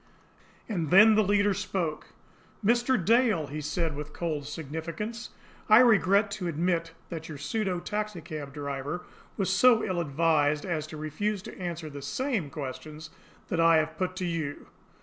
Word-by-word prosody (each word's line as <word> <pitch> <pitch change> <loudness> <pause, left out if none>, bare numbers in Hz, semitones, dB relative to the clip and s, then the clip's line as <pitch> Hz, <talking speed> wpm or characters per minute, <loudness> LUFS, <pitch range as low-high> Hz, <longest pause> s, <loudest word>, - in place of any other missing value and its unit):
And 175 -9 -2
then 215 +6 +8
the 215 - +4
leader 205 0 +3
spoke. 170 -4 -3 0.6
"Mr. 240 +3 +3
Dale," 225 -7 +3
he 150 +2 -6
said, 160 +1 -2
with 150 +1 -7
cold 155 -4 -3
significance, 165 - -5 0.4
"I 215 - +9
regret 205 -4 +5
to 200 -3 -3
admit 165 0 -1 0.2
that 165 -2 -6
your 155 - -6
pseudo 185 +4 -2
taxicab 170 -8 -5
driver 140 +4 -4 0.3
was 195 - 0
so 250 -3 +5
ill 185 -4 -1
advised 150 -1 +1
as 160 -4 -2
to 155 - -8
refuse 185 +7 -2
to - - -10
answer 170 -3 -4
the 145 -1 -8
SAME 195 - -2
questions 150 +3 -7 0.4
that 175 - -1
I 165 -1 +6
have 155 0 0
put 185 +1 -2
to 185 - -3
you." 160 -4 -4
170 Hz, 155 wpm, -28 LUFS, 155-205 Hz, 0.6 s, I